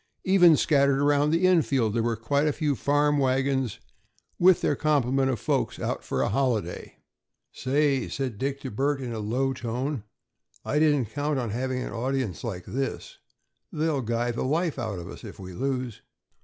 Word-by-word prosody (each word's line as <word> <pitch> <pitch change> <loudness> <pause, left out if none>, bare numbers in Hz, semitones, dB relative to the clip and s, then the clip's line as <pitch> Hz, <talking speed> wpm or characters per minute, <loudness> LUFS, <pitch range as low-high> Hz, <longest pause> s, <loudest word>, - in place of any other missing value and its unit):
Even 180 -4 +6
scattered 140 -2 +3
around 145 +1 +3
the 165 +4 +2
infield 140 - +3
there 115 - +1
were 115 0 0
quite 140 +7 0
a - - +3
few 150 -2 0
farm 145 +3 +2
wagons, 135 -3 0 0.6
with 180 0 +5
their - - +1
complement 135 -3 +1
of 125 -5 -1
folks - - -1
out - - -3
for - - -1
a - - 0
holiday. 120 -1 -1 0.6
"Say," 135 -1 0
said 130 -7 -4
Dick 140 0 -2
to 130 - -5
Bert 140 +6 0
in 125 -3 -5
a 110 - -4
low 125 +6 0
tone, 125 +1 -3 0.6
"I 150 - +1
didn't 145 -7 +2
count 145 0 -1
on 120 -4 -2
having 130 +2 -2
an - - -6
audience 130 -4 -2
like 95 -7 -5
this. 135 +2 -4 0.5
They'll 155 -2 0
guy 120 +1 -1
the 120 - -4
life 155 +2 0
out 110 -5 -3
of 85 -1 -7
us - - -10
if - - -9
we 95 -1 -9
lose." 130 0 -3
135 Hz, 180 wpm, -26 LUFS, 120-145 Hz, 0.6 s, Even